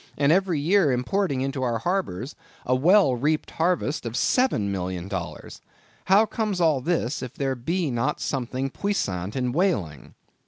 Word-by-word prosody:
and 140 +1 +3
every 180 -3 +2
year 170 0 +3
importing 135 +3 0
into 135 0 -2
our 120 -3 0
harbors 140 - -2 0.3
a 130 - +1
well 150 +1 +4
reaped 150 +5 -1
harvest 165 -2 0
of 115 - -5
$7,000,000. 95 - -1 0.4
How 200 +4 +5
comes 210 -3 -2
all 155 -6 +3
this, 155 -3 -1
if 125 -1 -7
there 135 -1 -1
be 160 +5 -2
not 120 +5 -1
something 130 0 -3
puissant 100 - -2
in 125 -2 -1
whaling? 120 - -1
135 Hz, 145 wpm, -25 LUFS, 120-180 Hz, 0.4 s, How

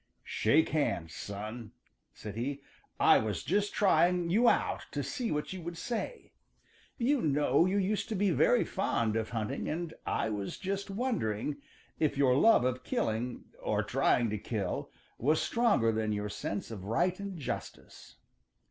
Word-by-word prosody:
"Shake 150 +9 +3
hands, 90 - -1
son," 105 +3 -6 0.4
said 105 -2 -8
he. 135 +5 -3 0.4
"I - - +6
was 105 -5 -2
just 205 +3 +1
trying 180 -3 +3
you 235 +5 +5
out - - 0
to - - -1
see 245 -4 -3
what 150 +4 -2
you 185 - -6
would 170 0 -6
say. 245 - -4 0.7
You 260 +2 +2
know 145 +2 +3
you 195 +2 +1
used 200 +1 0
to 220 - -1
be 200 0 +2
very - - +4
fond 110 -2 0
of 110 -1 -1
hunting, 110 -3 -3
and 165 +1 -3
I 110 - -1
was 100 -2 -4
just 195 +1 -3
wondering 160 - -1 0.4
if 150 -3 +1
your 130 -3 +4
love 220 - +5
of 130 0 -1
killing, 115 +1 -2 0.2
or - - 0
trying 120 -3 +2
to 105 - -2
kill, 100 -4 -3 0.3
was 150 +6 +3
stronger 220 - +2
than 110 -1 -1
your 105 0 -2
sense 100 +1 -4
of 100 -4 -7
right 175 - +1
and 200 -2 -5
justice. 150 - -7
145 Hz, 160 wpm, -31 LUFS, -, 0.7 s, I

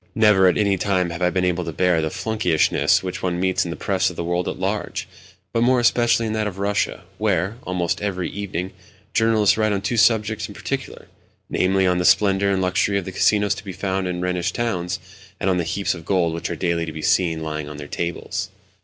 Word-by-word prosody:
Never 105 -4 +5
at 90 - +3
any 100 -2 +2
time 90 -3 +1
have 85 +2 -6
I 90 - +3
been 90 0 0
able 90 0 0
to 85 - -4
bear 90 0 +2
the 80 - -1
flunkeyishness 100 -6 +1
which 90 -1 -4
one 90 -1 -1
meets 95 0 +1
in - - -4
the 85 - -5
Press 95 -2 +1
of 90 - -9
the 85 - -3
world 85 +1 -1
at - - -3
large, - - -3 0.5
but 115 - +1
more 125 +1 +4
especially 120 -1 +3
in 110 - -2
that 110 -1 0
of 95 -2 -6
Russia, 100 -1 -1 0.2
where, 100 0 0
almost 90 -2 -1
every 95 -3 -2
evening, 95 -2 -4 0.4
journalists 110 -3 +3
write 110 -1 +2
on 100 - -1
two 115 +4 -1
subjects 110 -1 +2
in 100 - -11
particular—namely, 95 -7 -3
on 90 -1 +2
the 90 - 0
splendour 100 0 +4
and 95 -1 +1
luxury 90 +2 +1
of 95 - -3
the 95 - -5
casinos 105 +2 +2
to 100 0 -9
be 95 -3 -7
found 95 0 -2
in 90 -1 -3
the - - -1
Rhenish 90 -1 -1
towns, 95 -6 -2 0.4
and 95 - +1
on 90 - +1
the 85 - 0
heaps 100 +4 -1
of 85 -2 -9
gold 85 -2 +1
which 85 - -4
are - - -3
daily 85 -2 -1
to - - -4
be 80 -1 -7
seen 80 -3 +2
lying 75 -1 -4
on 75 - -8
their 75 -1 -8
tables. 85 +3 -3
95 Hz, 230 wpm, -22 LUFS, 90-105 Hz, 0.5 s, Never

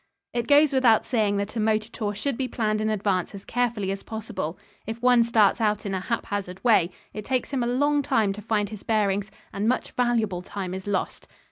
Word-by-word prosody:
It 240 -1 -2
goes 290 0 +5
without 245 -5 +4
saying 215 -5 +1
that 200 +2 -3
a - - -1
motor 215 0 +1
tour 210 -4 -3
should 275 +6 -2
be 260 +1 -2
planned 215 -3 -1
in 215 - 0
advance 200 -3 -1
as 195 - -10
carefully 230 -5 -1
as 195 - -4
possible. 220 -7 -5 0.3
If 225 +1 -4
one 245 -1 +5
starts 230 -1 +3
out 210 -1 +1
in 195 - -2
a 190 - 0
haphazard 195 -2 -4
way, 215 -8 +4 0.2
it 210 - -6
takes 255 +4 -1
him 270 -3 0
a 240 - 0
long 285 +4 +2
time 215 -7 +1
to 210 - -8
find 210 -1 0
his 215 -2 -8
bearings, 205 -2 0 0.2
and 205 +3 0
much 255 - -1
valuable 225 -7 0
time 185 0 -5
is 190 +1 -6
lost. 200 -2 -2
215 Hz, 215 wpm, -25 LUFS, 200-240 Hz, 0.3 s, goes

